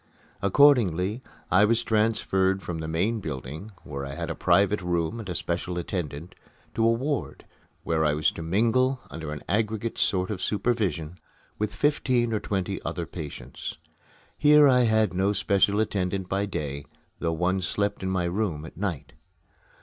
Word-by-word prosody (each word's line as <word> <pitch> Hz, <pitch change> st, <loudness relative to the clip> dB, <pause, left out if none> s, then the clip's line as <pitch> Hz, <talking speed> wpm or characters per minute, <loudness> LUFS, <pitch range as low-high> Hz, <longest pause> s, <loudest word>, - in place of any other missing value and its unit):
Accordingly, 105 Hz, -, +4 dB, 0.3 s
I 95 Hz, +2 st, +6 dB
was 115 Hz, +2 st, +3 dB
transferred 95 Hz, -3 st, +1 dB
from 85 Hz, -2 st, -4 dB
the 80 Hz, -, -4 dB
main 95 Hz, +8 st, 0 dB
building, 75 Hz, -, -6 dB
where 70 Hz, -2 st, -6 dB
I 70 Hz, 0 st, -6 dB
had -, -, -3 dB
a -, -, -4 dB
private 100 Hz, +1 st, +3 dB
room 90 Hz, +4 st, -1 dB
and 105 Hz, -4 st, -7 dB
a 90 Hz, -, -3 dB
special 90 Hz, +1 st, -2 dB
attendant, 85 Hz, -3 st, -4 dB, 0.4 s
to 115 Hz, -, 0 dB
a 115 Hz, -, +5 dB
ward 135 Hz, +5 st, -2 dB, 0.4 s
where 80 Hz, -1 st, +1 dB
I 75 Hz, -1 st, +2 dB
was 75 Hz, 0 st, +2 dB
to -, -, -8 dB
mingle, 115 Hz, +9 st, +2 dB
under 80 Hz, -2 st, -6 dB
an 75 Hz, -1 st, -6 dB
aggregate 110 Hz, +1 st, -1 dB
sort 95 Hz, +1 st, +1 dB
of 95 Hz, -3 st, -4 dB
supervision, 95 Hz, -7 st, -1 dB, 0.4 s
with 105 Hz, 0 st, -2 dB
fifteen 125 Hz, -3 st, +1 dB
or 110 Hz, -, +1 dB
twenty 95 Hz, -1 st, -2 dB
other 85 Hz, -, -3 dB
patients. 80 Hz, -3 st, -7 dB, 0.6 s
Here 150 Hz, 0 st, +7 dB
I 125 Hz, -2 st, +5 dB
had 110 Hz, -4 st, +2 dB
no 95 Hz, +3 st, +1 dB
special 100 Hz, +1 st, +2 dB
attendant 95 Hz, -3 st, -1 dB
by 100 Hz, +2 st, -1 dB
day, 70 Hz, -6 st, -4 dB, 0.3 s
though 80 Hz, -1 st, 0 dB
one 90 Hz, +3 st, 0 dB
slept 100 Hz, +3 st, -1 dB
in 95 Hz, -, -2 dB
my 95 Hz, -1 st, 0 dB
room 85 Hz, -4 st, -2 dB
at -, -, -11 dB
night. 80 Hz, -10 st, -4 dB
95 Hz, 165 wpm, -26 LUFS, 85-110 Hz, 0.6 s, Here